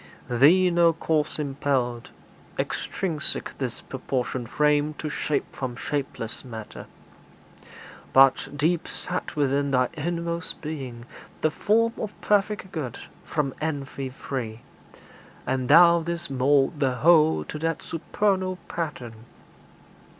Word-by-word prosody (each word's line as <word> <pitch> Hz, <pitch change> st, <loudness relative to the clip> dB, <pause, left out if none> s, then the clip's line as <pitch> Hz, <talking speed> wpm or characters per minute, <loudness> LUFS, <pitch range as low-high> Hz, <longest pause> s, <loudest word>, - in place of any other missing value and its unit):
Thee 170 Hz, +9 st, +5 dB
no 170 Hz, -1 st, +4 dB
cause 155 Hz, -2 st, 0 dB
impelled 135 Hz, -4 st, -1 dB, 0.5 s
Extrinsic 160 Hz, -6 st, -2 dB
this 125 Hz, -3 st, -3 dB
proportioned 130 Hz, -2 st, -3 dB
frame 150 Hz, 0 st, +2 dB
to 155 Hz, 0 st, -5 dB
shape 150 Hz, -, -2 dB
From 130 Hz, -2 st, -4 dB
shapeless 135 Hz, -4 st, -4 dB
matter; 110 Hz, -4 st, -8 dB, 1.2 s
but, 135 Hz, 0 st, +5 dB
deep 165 Hz, +4 st, +1 dB
set 180 Hz, -1 st, -3 dB
within 140 Hz, -1 st, +1 dB
Thy 125 Hz, -2 st, +2 dB
inmost 170 Hz, +1 st, -3 dB
being, 130 Hz, -7 st, -6 dB, 0.4 s
the 155 Hz, -, +2 dB
form 230 Hz, +6 st, +2 dB
of 210 Hz, -1 st, -5 dB
perfect 205 Hz, -1 st, +1 dB
good, 145 Hz, -, -4 dB, 0.3 s
From 140 Hz, -4 st, -1 dB
envy 140 Hz, -3 st, -3 dB
free; 120 Hz, -4 st, -5 dB, 0.8 s
and 130 Hz, -1 st, -1 dB
Thou 170 Hz, +2 st, +8 dB
didst 170 Hz, -2 st, -4 dB
mould 135 Hz, +3 st, +2 dB
the 130 Hz, -3 st, +1 dB
whole 160 Hz, +2 st, +5 dB
To 150 Hz, -, -7 dB
that 165 Hz, +1 st, -2 dB
supernal 185 Hz, +2 st, 0 dB
pattern. 120 Hz, -9 st, -5 dB
150 Hz, 115 wpm, -25 LUFS, 130-170 Hz, 1.2 s, Thou